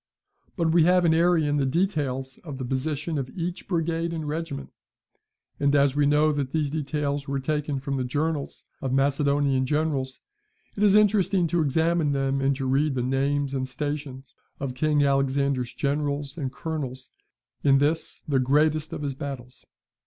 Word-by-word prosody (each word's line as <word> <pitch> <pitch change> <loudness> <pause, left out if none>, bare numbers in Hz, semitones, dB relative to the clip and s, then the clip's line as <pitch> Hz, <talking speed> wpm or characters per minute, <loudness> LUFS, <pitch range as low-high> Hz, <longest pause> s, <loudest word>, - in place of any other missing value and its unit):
But 165 -2 +2
we 165 -1 +5
have 180 0 +4
in 160 - +4
Arrian 160 -3 +3
the 140 - +1
details 135 -5 -1
of 145 -6 -8
the 130 - -4
position 145 +4 -2
of 130 -2 -4
each 175 +1 -4
brigade 165 -1 -1
and 160 -2 -4
regiment; 155 -2 -4 0.9
and 140 0 +2
as 140 -1 +3
we 145 -1 +3
know 150 +1 +4
that 140 -3 -3
these 150 -3 0
details 145 -2 -2
were 140 0 -1
taken 150 0 -2
from 135 +1 -3
the 130 - -1
journals 145 +3 -2 0.2
of 135 - -2
Macedonian 140 -1 +2
generals, 145 -3 -1 0.6
it 200 - -4
is 205 -1 +5
interesting 200 -3 +3
to 170 +1 +1
examine 160 +1 +1
them, 135 0 0
and 135 0 +2
to 135 0 -4
read 135 +2 +1
the 125 - -1
names 135 +2 0
and 130 -1 -2
stations 135 -1 -5 0.3
of 135 -2 -3
King 150 +2 +2
Alexander's 135 -2 +1
generals 145 -1 -2
and 140 -6 -3
colonels 135 -4 -5 0.5
in 135 -1 +5
this 150 +4 -1
the 140 -3 +2
greatest 150 +4 +2
of 155 -2 -5
his 140 -1 -2
battles. 130 -3 -8
145 Hz, 165 wpm, -25 LUFS, 135-160 Hz, 0.9 s, we